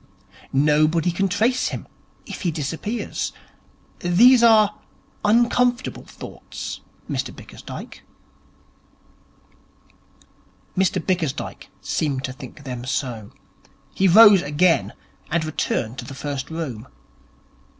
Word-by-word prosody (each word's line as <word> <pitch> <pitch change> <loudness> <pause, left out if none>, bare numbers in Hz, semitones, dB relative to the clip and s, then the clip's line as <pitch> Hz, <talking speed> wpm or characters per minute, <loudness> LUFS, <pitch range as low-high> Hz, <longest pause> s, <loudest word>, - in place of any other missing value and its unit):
Nobody 155 +4 +3
can 195 +3 0
trace 230 +7 +1
him - - -5 0.4
if - - -8
he 180 - 0
disappears. 165 - -3 0.7
These 235 +9 +6
are 215 -3 +5 0.4
uncomfortable 240 +3 +2
thoughts, - - -8 0.3
Mr - - -3
Bickersdyke.' - - -10 2.7
Mr 190 -1 +1
Bickersdyke 170 -7 -2
seemed 140 -4 -1
to 130 - -4
think 135 +2 -11
them 125 -3 -6
so. 125 -5 -3 0.6
He 195 - +2
rose 205 0 +8
again, 150 +1 +2 0.4
and 165 0 0
returned 120 -5 -2
to - - -6
the 135 - -9
first 140 -1 -4
room. 135 -8 -5
165 Hz, 100 wpm, -22 LUFS, 140-205 Hz, 2.7 s, rose